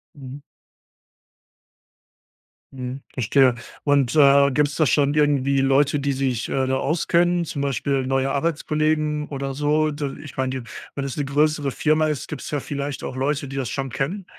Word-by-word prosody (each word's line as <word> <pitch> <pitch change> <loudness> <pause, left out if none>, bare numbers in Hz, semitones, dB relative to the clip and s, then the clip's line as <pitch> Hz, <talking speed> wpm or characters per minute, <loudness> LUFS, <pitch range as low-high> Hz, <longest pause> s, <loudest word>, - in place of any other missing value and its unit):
Mhm. 135 0 -9 2.3
Mhm, 130 +1 -6
verstehe. 130 +1 +3 0.3
Und, 140 -2 +2
äh, 140 -1 +6
gibt's 145 +1 +1
da 155 - +3
schon 140 +3 +2
irgendwie 140 -2 +2
Leute, 140 +2 +3
die 140 0 0
sich, 130 -3 -1
äh, 130 -1 0
da 130 0 +1
auskennen? 175 +2 +1
Zum 145 -3 -5
Beispiel 135 -1 -1
neue 135 0 +1
Arbeitskollegen 155 0 0
oder 135 -1 -4
so? 150 +2 +1
D 145 -1 -4
ich 145 - -11
meine 130 0 -1
die 120 - -14 0.3
wenn 140 - -3
es 135 -1 -5
'ne 145 - -1
größere 145 0 +1
Firma 155 +2 +2
ist, 150 -3 -3
gibt's 150 - -6
ja 145 -2 -2
vielleicht 140 0 -5
auch 130 - -5
Leute, 140 +1 -1
die 135 - -6
das 130 -5 -2
schon 135 -1 -3
kennen. 145 +10 -3
140 Hz, 165 wpm, -22 LUFS, 135-150 Hz, 2.3 s, äh